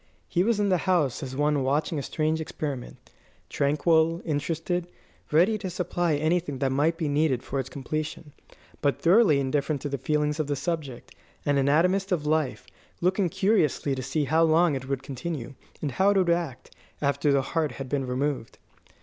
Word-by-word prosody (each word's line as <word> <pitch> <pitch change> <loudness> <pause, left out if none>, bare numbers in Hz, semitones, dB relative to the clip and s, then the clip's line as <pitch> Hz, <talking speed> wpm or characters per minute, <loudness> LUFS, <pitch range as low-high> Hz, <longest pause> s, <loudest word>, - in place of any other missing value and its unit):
He 175 - +1
was 225 0 +1
in 205 -1 +2
the 185 -2 +3
house 155 -9 +2
as 130 -2 -5
one 145 0 +1
watching 145 +3 0
a - - -2
strange 155 +3 -1
experiment 145 -5 -6 0.4
tranquil, 160 +3 +2
interested, 165 +3 -2 0.4
ready 185 +8 +4
to 190 -2 -4
supply 175 -2 -1
anything 155 -1 0
that 135 0 0
might 150 +5 +1
be 160 - -1
needed 145 -3 +1
for 135 - -3
its 130 -1 -4
completion, 150 +2 -5 0.5
but 140 -1 +1
thoroughly 175 -4 +5
indifferent 140 +2 0
to 145 - -2
the 140 -1 -3
feelings 150 +2 0
of 155 - 0
the 145 - 0
subject; 140 -3 -4 0.3
an 145 -1 +2
anatomist 180 +8 +2
of 160 -5 0
life, 155 -3 0 0.3
looking 185 +1 +1
curiously 165 -8 +1
to 130 - -3
see 135 +4 -1
how 160 +4 +2
long 165 0 +4
it 130 -1 -4
would 135 -1 -2
continue, 135 0 -5 0.3
and 145 - -1
how 190 +8 +3
it 205 - +3
would 180 -3 +3
act, 170 -7 -3 0.2
after 140 0 +1
the 140 -1 +3
heart 160 -3 0
had 135 - -6
been 135 0 -2
removed. 130 -2 -2
150 Hz, 180 wpm, -26 LUFS, 140-170 Hz, 0.5 s, thoroughly